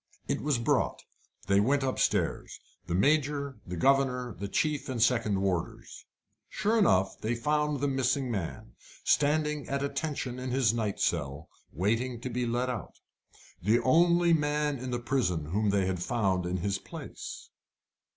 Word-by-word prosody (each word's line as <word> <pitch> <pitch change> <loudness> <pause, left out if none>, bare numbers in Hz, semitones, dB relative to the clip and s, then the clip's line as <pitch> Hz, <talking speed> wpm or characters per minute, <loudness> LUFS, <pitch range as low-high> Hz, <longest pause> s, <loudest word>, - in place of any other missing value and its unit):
It - - -1
was 145 -3 +1
brought. 115 - 0 0.4
They 100 0 +3
went 135 +6 +2
upstairs 130 -1 0 0.3
the 85 - -1
Major, 140 +4 +1
the 90 - -4
governor, 125 0 +2
the 100 +2 -5
chief 150 +9 -1
and 125 -2 -3
second 110 -4 +2
warders. 90 -4 -3 0.4
Sure 215 +4 +1
enough 95 - +3
they 115 +2 -1
found 150 +3 0
the 145 - +2
missing 135 -1 0
man, 90 - -4 0.3
standing 150 0 +1
at 140 0 -1
attention 140 -3 -3
in 130 0 -4
his 125 -4 +2
night 110 -4 -2
cell, 75 -3 -1 0.2
waiting 115 - -1
to 125 - -4
be 125 0 -1
let 120 +2 0
out 120 -8 -5 0.7
the 105 +6 +3
only 170 +4 +4
man 150 -2 +1
in 130 +1 -5
the 120 - -1
prison 120 - 0
whom 105 +2 +1
they 100 -1 +2
had 95 -2 -2
found 95 -5 0
in 90 +1 -1
his 95 +2 -1
place. - - -9
125 Hz, 155 wpm, -29 LUFS, 100-140 Hz, 0.7 s, only